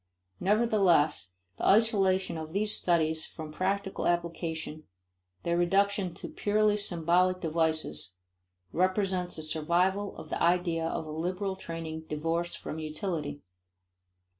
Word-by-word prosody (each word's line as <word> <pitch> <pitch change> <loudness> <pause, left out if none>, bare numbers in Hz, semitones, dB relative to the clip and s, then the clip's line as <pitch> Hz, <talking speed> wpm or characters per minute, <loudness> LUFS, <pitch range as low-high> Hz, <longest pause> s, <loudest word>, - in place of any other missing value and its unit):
Nevertheless 185 - +3 0.3
the - - -1
isolation 195 -4 +3
of 160 0 -6
these 210 +2 +3
studies 160 -2 +2
from 155 -2 -8
practical 195 +4 -1
application, 165 -2 -2 0.6
their 170 - +1
reduction 195 +1 +2
to - - -7
purely 210 0 +2
symbolic 180 -1 +1
devices, 155 - 0 0.6
represents 185 -1 +1
a 155 - -4
survival 175 +6 0
of - - -9
the - - -3
idea 170 -1 +2
of 160 - -3
a 155 - -7
liberal 180 +5 -2
training 165 -3 -6
divorced 165 +3 -1
from 155 - -6
utility. 155 -2 -4
175 Hz, 115 wpm, -29 LUFS, 160-190 Hz, 0.6 s, Nevertheless